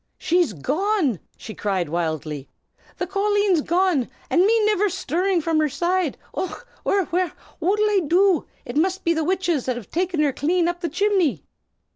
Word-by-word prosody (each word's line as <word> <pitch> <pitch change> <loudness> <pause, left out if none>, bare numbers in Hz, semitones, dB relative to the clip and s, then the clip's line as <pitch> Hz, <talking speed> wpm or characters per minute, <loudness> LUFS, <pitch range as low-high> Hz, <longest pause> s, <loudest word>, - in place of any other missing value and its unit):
"She's 350 - +1
gone!" 295 - 0 0.2
she 220 - -8
cried 195 -5 -1
wildly. 155 -3 -3 0.5
"The 360 - -1
colleen's 400 -2 +2
gone, 345 -5 +1 0.2
an' 350 - +5
me 450 -1 +3
niver 420 -1 +2
shtirrin' 360 0 0
from 325 -1 +1
her 305 -1 +2
side! 350 +1 0 0.2
Och, 430 +6 -5 0.2
wirra, 390 -3 +1
wirra! 360 0 0 0.3
what'll 400 +6 +2
I 415 -2 +3
do? 365 0 +3 0.2
It 240 - -5
must 370 +4 +1
be 335 - +2
the 320 -1 0
witches 350 -5 0
has 240 -4 -2
taken 355 - -2
her 285 -2 +1
clane 340 +5 +1
up 350 0 -2
chimley." 360 - +1
350 Hz, 160 wpm, -23 LUFS, 285-380 Hz, 0.5 s, an